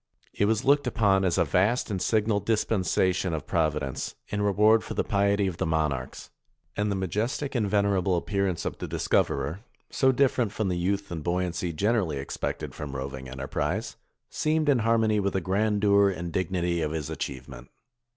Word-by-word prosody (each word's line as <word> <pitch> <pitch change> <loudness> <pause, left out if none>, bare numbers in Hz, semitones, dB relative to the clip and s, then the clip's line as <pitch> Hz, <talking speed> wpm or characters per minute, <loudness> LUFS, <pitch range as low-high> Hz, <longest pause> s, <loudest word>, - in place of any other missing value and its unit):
It 100 - +1
was 110 +1 +1
looked 140 -1 +4
upon 100 -5 +2
as 90 -3 +1
a - - +3
vast 105 +6 +1
and 95 -3 -2
signal 110 0 +1
dispensation 95 -5 +1
of 75 - -5
Providence, 75 -5 -1
in 105 - -2
reward 105 +2 +4
for - - -6
the - - +1
piety 100 0 +1
of 90 -3 -3
the - - -1
monarchs; 75 -5 -2 0.4
and 105 0 0
the 100 - 0
majestic 105 - -2
and 110 -6 0
venerable 100 -3 +2
appearance 100 -1 -1
of - - -4
the - - -4
dis - - -4
coverer, 70 +6 +1 0.3
so 130 -1 +3
different 125 -4 +2
from 110 -3 -1
the 90 - 0
youth 100 +2 -1
and 80 -3 -4
buoyancy 90 0 -1
generally 100 -2 0
expected 70 - -4
from 70 -2 -6
roving 65 -1 -6
enterprise, 65 +1 -3 0.3
seemed 155 0 0
in 135 -4 +4
harmony 110 -1 +2
with 100 -1 0
the 95 - +1
grandeur 100 +2 +3
and 85 -3 -5
dignity 90 -2 -1
of 75 - 0
his 80 -3 -4
achieve 65 -2 -5
ment. - - -11
95 Hz, 180 wpm, -27 LUFS, 85-105 Hz, 0.4 s, looked